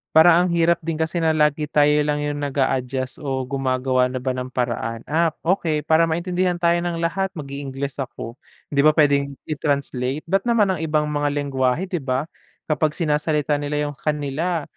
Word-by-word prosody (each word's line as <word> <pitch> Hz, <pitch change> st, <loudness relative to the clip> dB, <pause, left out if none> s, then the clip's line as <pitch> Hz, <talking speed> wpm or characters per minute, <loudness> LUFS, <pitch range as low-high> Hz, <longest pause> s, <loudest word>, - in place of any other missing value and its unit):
Parang 175 Hz, +2 st, +7 dB
ang -, -, -2 dB
hirap 170 Hz, 0 st, +3 dB
din 165 Hz, -1 st, -3 dB
kasi 160 Hz, +2 st, -1 dB
na 160 Hz, -1 st, +2 dB
lagi 150 Hz, 0 st, +2 dB
tayo 150 Hz, 0 st, +4 dB, 0.2 s
lang 145 Hz, 0 st, 0 dB
yung 145 Hz, 0 st, -2 dB
nag-aadjust 130 Hz, -2 st, -1 dB
o 135 Hz, -2 st, -2 dB
gumagawa 130 Hz, -1 st, 0 dB
na 130 Hz, -, -7 dB
ba 130 Hz, +1 st, -1 dB
ng 125 Hz, 0 st, -4 dB
paraan, 120 Hz, -2 st, -3 dB
"Ah, 165 Hz, +2 st, +3 dB, 0.2 s
okey 165 Hz, -4 st, 0 dB
para 160 Hz, +2 st, +3 dB
maintindihan 180 Hz, +2 st, 0 dB
tayo 170 Hz, 0 st, +2 dB
ng 170 Hz, -1 st, -3 dB
lahat 190 Hz, +3 st, 0 dB
mag-i-Ingles 140 Hz, -1 st, -5 dB
ako," 120 Hz, -1 st, -6 dB, 0.3 s
'di 140 Hz, -, 0 dB
ba 155 Hz, +1 st, +5 dB
puwedeng 140 Hz, -2 st, +2 dB
i-translate, 140 Hz, -2 st, -2 dB
ba't 195 Hz, +6 st, 0 dB
naman 215 Hz, -5 st, +3 dB
ang 180 Hz, -, -2 dB
ibang 155 Hz, -1 st, +1 dB
mga 145 Hz, 0 st, 0 dB
lenggwahe 135 Hz, +1 st, 0 dB
'di 180 Hz, -3 st, -3 dB
ba 130 Hz, 0 st, -1 dB, 0.4 s
kapag 155 Hz, 0 st, 0 dB
sinasalita 150 Hz, -2 st, 0 dB
nila 145 Hz, 0 st, -2 dB
yung 145 Hz, -, -15 dB
kanila. 150 Hz, +3 st, -1 dB
150 Hz, 175 wpm, -22 LUFS, 135-165 Hz, 0.4 s, Parang